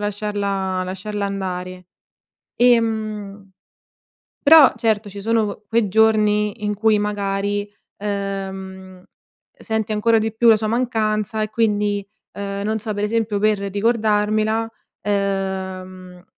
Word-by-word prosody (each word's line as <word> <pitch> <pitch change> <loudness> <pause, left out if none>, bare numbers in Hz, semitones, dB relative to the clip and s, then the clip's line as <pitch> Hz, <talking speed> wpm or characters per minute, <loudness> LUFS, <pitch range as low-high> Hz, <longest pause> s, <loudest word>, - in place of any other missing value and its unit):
lasciarla 200 -2 -2
lasciarla 200 +2 -4
andare. 185 -2 -5 0.7
Ehm, 215 -4 +1 0.9
però, 305 -2 +8
certo, 220 -3 0
ci 200 +1 -8
sono 220 -1 0
q 210 - -42
quei 225 -2 +2
giorni 210 -1 +2
in 210 0 0
cui, 215 +1 +2
magari, 205 0 -2 0.3
uhm, 190 -2 -5 0.6
senti 220 -1 -2
ancora 225 +2 +3
di 220 0 -2
più 235 +1 +2
la 220 - +7
sua 215 0 -2
mancanza, 220 -2 0
e 215 - -3
quindi, 210 -2 0 0.3
uhm, 200 0 -4
non 220 +1 -1
so, 215 0 -4
per 205 - -3
esempio, 215 -1 0
per 215 -1 +2
ricordarmela, 215 +1 +1 0.3
uhm, 190 -2 -3
210 Hz, 115 wpm, -21 LUFS, 195-220 Hz, 0.9 s, però